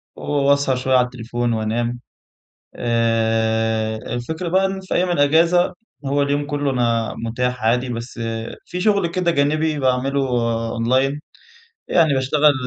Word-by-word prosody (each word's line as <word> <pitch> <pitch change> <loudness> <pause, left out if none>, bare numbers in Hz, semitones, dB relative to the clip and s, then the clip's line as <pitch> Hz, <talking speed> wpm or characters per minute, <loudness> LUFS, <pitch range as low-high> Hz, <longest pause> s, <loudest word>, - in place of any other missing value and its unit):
وأسهر 140 -1 +1
شويّة 130 +1 +1
على 125 - +4
التليفون، 120 -1 -3
وأنام. 115 +2 -2 0.8
آآ، 110 -1 +1
الفكرة 120 +10 -4
بقى 190 +3 +3
إن 190 0 -4
في 185 - -5
أيّام 180 0 +1
الإجازة 170 +3 +3 0.3
هو 140 +1 +1
اليوم 145 +1 0
كلّه 145 -1 -1
أنا 115 -3 0
متاح 125 +1 -2
عادي، 125 +3 +2
بس 120 0 -6 0.5
في 180 +1 -5
شغل 200 -3 +2
كده 175 0 0
جانبي 155 +1 +1
باعمله 135 +1 +1 0.5
أونلاين. 130 +5 +1 0.7
يعني 160 -4 +3
باشتغل 145 +3 +3
130 Hz, 130 wpm, -20 LUFS, 115-150 Hz, 0.8 s, على